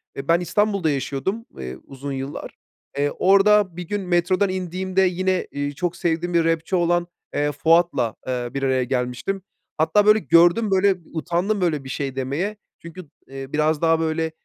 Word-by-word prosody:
eee, 135 0 -6
ben 170 +1 +4
İstanbul'da 195 -1 0
yaşıyordum, 145 - -2
ııı, 65 0 -7
uzun 140 +1 -7
yıllar. 135 +1 -5 0.5
Eee, 145 0 +1
orada 195 -1 +4
bir 180 -1 -6
gün 205 +2 -2
metrodan 185 +2 +1
indiğimde 185 +1 -1
yine, 185 0 +1
eee, 145 0 -3
çok 175 +4 -3
sevdiğim 170 +1 -1
bir 170 -1 +3
rapçi 165 +3 0
olan, 175 0 +1 0.3
eee, 145 0 0
Fuat'la, 155 -5 +2
eee, 125 -1 -2
bir 140 - -3
araya 130 -1 +2
gelmiştim. 125 +9 -2 0.4
Hatta, 200 +6 +3
böyle, 215 +1 +6
gördüm, 175 +4 +4
böyle, 195 0 +4 0.2
utandım 175 +5 -1
böyle 155 -6 0
bir 130 - -9
şey 135 -1 -3
demeye. 145 +11 -2 0.2
Çünkü, 170 -1 -11 0.2
eee, 135 0 -9
biraz 155 +1 +1
daha, 165 -1 +4
eee, 160 - -3
böyle 160 0 -1
170 Hz, 170 wpm, -22 LUFS, 140-185 Hz, 0.5 s, böyle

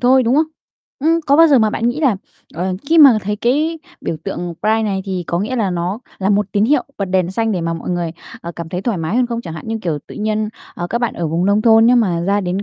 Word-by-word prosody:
thôi, 255 +1 +4
đúng 245 +2 +2
không? 310 +1 +3 0.6
Ừm, 330 +2 +3
có 280 - +4
bao 330 +1 +8
giờ 275 - +5
mà 220 -2 +3
bạn 230 +3 0
nghĩ 265 +6 -2
là, 260 -10 +3 0.4
ờ, 185 +3 -2 0.2
khi 330 0 +4
mà 270 -7 +8
thấy 210 +2 -2
cái 300 +9 0 0.2
biểu 160 - -3
tượng 175 -3 -4
pride 220 +1 +2
này 200 -3 -1
thì 185 -3 -3
có 170 - -1
nghĩa 250 +6 -2
là 205 -5 0
nó 180 +4 -2 0.2
là 195 +1 0
một 205 -1 +2
tín 205 +1 +2
hiệu 280 +3 +3 0.2
bật 200 - 0
đèn 185 -1 0
xanh 225 +2 0
để 180 - -1
mà 165 0 -2
mọi 165 - -5
người, 175 -2 -1 0.3
ờ, 170 0 -7
cảm 170 -1 -6
thấy 180 +2 -4
thoải 220 -6 -1
mái 165 +8 -2
hơn 250 - +3
không 235 -1 -3
chẳng 165 -8 -8
hạn 160 - -8
như, 225 0 -2
kiểu, 160 -4 -1
tự - - -11
nhiên, 215 0 -1 0.3
ờ, 175 - -4
các 235 - 0
bạn 240 - -1
ở 170 - -2
vùng 170 +3 0
nông 205 +1 +2
thôn 225 0 +6
nếu 245 - +5
mà 185 -8 +1
ra 200 +4 +1
đến 185 +1 -2
210 Hz, 285 wpm, -18 LUFS, 180-240 Hz, 0.6 s, bao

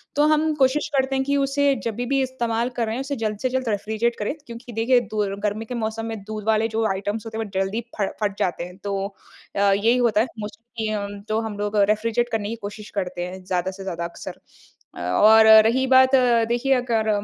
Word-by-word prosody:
तो 295 - +3
हम 310 0 +2
कोशिश 275 +2 +2
करते 265 0 +1
हैं 265 - +1
कि 280 +1 +1
उसे 275 0 +2
जभी 235 +1 -3
भी 275 +2 +1
इस्तेमाल 240 -2 -1
कर 235 - +1
रहे 220 +1 -3
हैं 260 - -3
उसे 280 +1 -3
जल्द 215 -2 -2
से 255 - 0
जल्द 260 -2 -1
रेफ़्रिजरेट 220 +3 -1
करें। 210 +6 -1
क्योंकि 235 +1 -9
देखिए 240 +3 +3
दूर 205 -2 -1
गर्मी 210 +2 -1
के 250 - -7
मौसम 225 -1 -3
में 225 -1 -4
दूध 215 0 -6
वाले 220 0 +3
जो 225 0 -1
आइटम्स 205 +3 -3
होते 220 0 -6
हैं 225 - -1
वह - - -10
जल्दी 195 +4 -1 0.2
फ 195 - +2
फट 205 -1 -1
जाते 175 -1 -1
हैं। 180 +1 -10
तो 200 -1 -2 0.6
अ, - - -1
यही 220 +5 +3
होता 225 -4 +3
है 250 - 0
मोस्टली 220 +2 -6 0.4
जो 215 +1 +1
हम 220 -2 -5
लोग 205 +1 -2
रेफ़्रिजरेट 230 +3 +1
करने 210 -2 -2
की 230 - -3
कोशिश 210 0 -10
करते 180 -1 -4
हैं 185 0 -9
ज़्यादा 185 0 -1
से 195 0 -9
ज़्यादा 170 -3 -4
अक्सर। 170 0 -8 0.6
अ, - - -9
और 215 - +6 0.2
रही 260 +3 +1
बात 260 +1 +6 0.3
देखिए 255 +3 +2
अगर 225 -3 0
225 Hz, 220 wpm, -23 LUFS, 205-245 Hz, 0.6 s, और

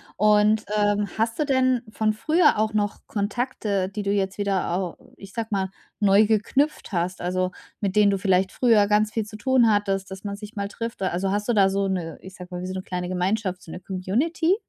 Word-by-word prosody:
Und, 210 +1 +4
ähm, 205 0 +2
hast 225 +1 0
du 305 - +2
denn 260 -3 +2
von 215 0 0
früher 305 +5 +3
auch 215 0 +1
noch 205 -1 0
Kontakte, 205 -2 -2
die 205 +1 -5
du 200 - 0
jetzt 195 -1 -1
wieder 200 -3 0
au 185 -3 -3 0.2
ich 195 -1 -12
sage 230 -2 -3
mal, 190 -2 0 0.3
neu 205 +1 +5
geknüpft 230 +9 0
hast, 180 0 -2
also 185 +1 -1 0.3
mit 200 -2 -2
denen 210 -1 +5
du 195 - +1
vielleicht 190 0 +2
früher 225 -5 +4
ganz 210 0 +2
viel 220 -1 -2
zu 215 0 -10
tun 250 +1 +3
hattest, 195 -2 0
dass 190 0 -8
man 200 -1 -4
sich 210 +2 -10
mal 200 -1 -2
trifft 230 +2 -6
da. 190 - +1
Also, 190 +2 -1
hast 205 +1 -1
du - - +4
da 195 -3 +5
so 195 0 0
'ne 175 -4 -3
ich 190 0 -11
sage 180 0 -10
mal, 180 - -4
wie 185 - -4
so 185 - -4
'ne 185 - -4
kleine 180 -1 -4
Gemeinschaft 185 +1 -1
so 160 - -11
'ne - - -7
Community? 250 - 0
205 Hz, 225 wpm, -24 LUFS, 190-220 Hz, 0.3 s, neu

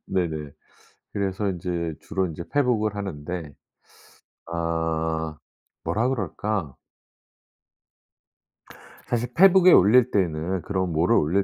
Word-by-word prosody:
네네. 80 -6 -2 0.6
그래서 100 0 -1
인제 85 -3 -3
주로 95 -1 -1
인제 80 +1 -7
페북을 115 -7 +1
하는데 90 -3 -5 1.0
아 80 -1 -2 0.5
뭐라 115 +4 0
그럴까? 100 - -2 2.3
사실 120 0 -2
페북에 185 +2 +7
올릴 120 - +6
때는 90 -1 0
그런 95 -3 -2
뭐를 85 +9 +2
올릴 90 +7 +2
95 Hz, 200 characters per minute, -24 LUFS, 80-105 Hz, 2.3 s, 페북에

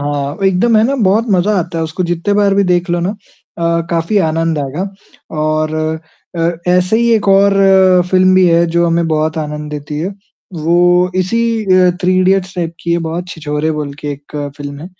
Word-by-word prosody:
हाँ। 145 0 -3
एकदम 215 +5 +2
है 215 - +4
ना, 275 +3 0
बहुत 220 +1 +2
मज़ा 195 +2 +2
आता 170 -1 -3
है, 160 - -1
उसको 160 +3 -4
जितने 175 +4 -1
बार 200 -1 +2
भी 200 - +3
देख 180 0 0
लो 175 - 0
ना 180 +3 -1 0.5
अ, 170 0 0
काफ़ी 170 +5 -1
आनंद 165 0 -1
आएगा 150 +8 -3 0.5
और 155 0 -1 0.6
अ, 165 0 +1 0.2
ऐसे 180 +4 +2
ही 235 0 +2
एक 210 -2 0
और 195 +1 +4 0.6
फ़िल्म 185 0 +4
भी 185 -1 +5
है 170 0 +3
जो 170 0 +3
हमें 170 0 +1
बहुत 155 0 -1
आनंद 150 0 -5
देती 150 0 -6
है, 175 +4 -2 0.5
वो 175 +3 +2
इसी 185 +6 0 0.2
अ, 185 -2 +4
थ्री 185 0 +2
इडियट्स 190 0 +1
टाइप 170 -2 -3
की 170 - -2
है 170 - +1
बहुत, 175 +2 -4
छिछोरे 155 -1 -3
बोल 150 -2 -4
के 150 - -5
एक 145 +2 -11 0.2
फ़िल्म 145 -1 -7
है, 165 - -8
170 Hz, 195 wpm, -14 LUFS, 155-185 Hz, 0.6 s, भी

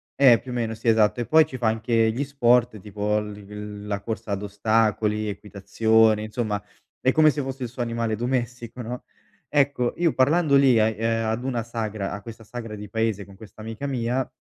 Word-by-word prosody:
eh, 125 -5 +6
più 130 - -12
o - - -4
meno, 115 -2 -1
sì, 110 +2 -7
esatto. 110 0 +3
E 120 - -4
poi 160 0 +6
ci 135 -4 -8
fa 115 - +1
anche 110 0 +2
gli 125 +6 -2
sport, 125 -5 +2
tipo 105 +1 -1
l 105 -1 -7
il 105 0 -9
la 100 -1 -3
corsa 110 0 -5
ad 100 0 -2
ostacoli, 105 +1 +1
equitazioni, 110 +2 +2
insomma 110 -1 -2 0.4
è 130 - +2
come 155 +2 +5
se 145 -1 -1
fosse 135 0 -6
il 125 - -3
suo 125 +1 -4
animale 115 -1 -2
domestico, 120 0 -3
no? 120 +2 -6 0.4
Ecco, 140 -4 +1
io 170 -3 +2
parlando 145 +2 +3
lì, 130 -4 +5
e 110 0 +2
ehm, 115 0 0
ad 110 +3 -2
una 125 -3 -1
sagra, 110 -3 -4
a 105 - -6
questa 115 +1 -10
sagra 115 0 -7
di 105 -1 -8
paese 110 -3 -1
con 100 0 -15
questa 105 +1 -13
amica 115 +5 -6
mia, 125 -1 -1
115 Hz, 205 wpm, -24 LUFS, 105-125 Hz, 0.4 s, eh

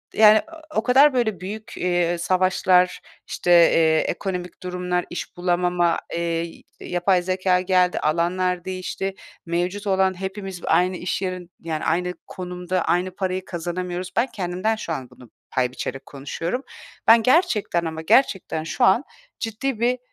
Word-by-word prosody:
yani, 215 0 +7 0.3
o 220 - +1
kadar 270 +4 +6
böyle 220 -7 0
büyük, 210 +4 -7
eee, 175 -1 +1
savaşlar, 185 0 +2 0.3
işte, 175 - -1
eee, 165 -2 +6
ekonomik 180 0 -3
durumlar, 180 0 -2
iş 175 - -6
bulamama, 175 -1 +1
eee, 170 0 -3 0.2
yapay 180 +1 +1
zekâ 185 0 +1
geldi, 180 -1 +2
alanlar 175 +3 0
değişti, 190 +1 -4 0.3
mevcut 180 +4 -2
olan 190 -1 +2
hepimiz 190 -1 -5
aynı 180 +1 +2
iş 180 +2 -3
yerin, 185 -2 -4
yani, 160 -2 -3
aynı 180 +2 0
konumda, 180 0 -3
aynı 180 +1 0
parayı 185 -1 -2
kazanamıyoruz. 180 +1 -4
Ben 235 +3 +3
kendimden 185 +1 -2
şu 190 -6 -4
an 130 -5 -6
bunu 125 - -16 0.2
pay 125 -1 +1
biçerek 135 +1 -5
konuşuyorum. 165 - -4 0.4
Ben 225 0 +7
gerçekten 245 - +2
ama 160 0 -4
gerçekten 180 -4 +2
şu 160 - -2
an 190 +8 +4 0.4
ciddi 230 +2 -3
bir, 245 +2 +1
180 Hz, 140 wpm, -23 LUFS, 175-195 Hz, 0.4 s, yani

